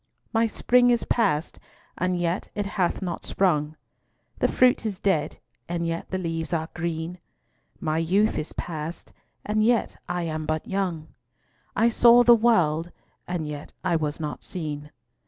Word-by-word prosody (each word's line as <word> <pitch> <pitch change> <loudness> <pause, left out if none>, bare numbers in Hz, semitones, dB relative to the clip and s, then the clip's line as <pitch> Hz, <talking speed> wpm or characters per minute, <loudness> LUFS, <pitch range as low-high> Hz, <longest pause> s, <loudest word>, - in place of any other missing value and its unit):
My 225 0 +3
spring 245 +3 +3
is 240 -1 +2
past, 185 -9 0 0.4
and 180 0 0
yet 175 +2 -1
it 205 - -1
hath 195 -1 -1
not 175 -3 -4
sprung; 155 -5 +1 0.6
The - - +3
fruit 250 -2 +3
is 210 -4 -3
dead, 190 -8 0 0.3
and 170 -1 -1
yet 165 0 -3
the 190 - -2
leaves 165 -2 -3
are 160 0 -1
green; 170 +1 -3 0.6
My 155 0 0
youth 195 +6 +2
is 155 - -5
past, 160 0 -6 0.3
and 215 +1 +1
yet 235 0 +2
I 175 0 -1
am 155 -1 -3
but 155 0 -2
young; 180 -5 -2 0.7
I 230 - +4
saw 240 +1 +7
the 240 0 +8
world, 175 -8 +3 0.4
and 175 -3 -2
yet 150 -1 -7
I 180 -2 +1
was 155 -1 -1
not 150 -2 -5
seen. 150 -4 -5
175 Hz, 155 wpm, -25 LUFS, 160-205 Hz, 0.7 s, the